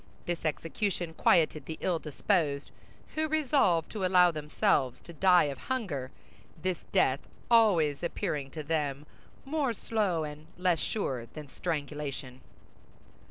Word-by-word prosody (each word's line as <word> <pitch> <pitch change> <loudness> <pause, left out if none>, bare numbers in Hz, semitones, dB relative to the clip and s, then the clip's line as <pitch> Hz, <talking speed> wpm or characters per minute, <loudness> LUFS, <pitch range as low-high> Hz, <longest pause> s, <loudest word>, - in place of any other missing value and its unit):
This 175 -1 -3
execution 165 +2 -2
quieted 155 -3 +3
the 160 - -5
ill 175 -3 0
disposed, 150 -2 0 0.4
who 315 0 0
resolved 275 - +2
to 210 -3 -4
allow 180 -1 +5
themselves 145 -4 +1
to 170 - -11
die 180 +2 +5
of 140 -3 -3
hunger—this 185 - -4
death 140 -8 +3 0.3
always 175 -11 +4
appearing 170 -5 -2
to 155 +2 -6
them 145 -2 -1 0.4
more 280 -3 0
slow 205 -7 0
and 150 +1 -8
less 180 -2 +2
sure 130 - -2
than 150 +4 -9
strangulation. 145 -4 -4
165 Hz, 120 wpm, -30 LUFS, 145-190 Hz, 0.4 s, allow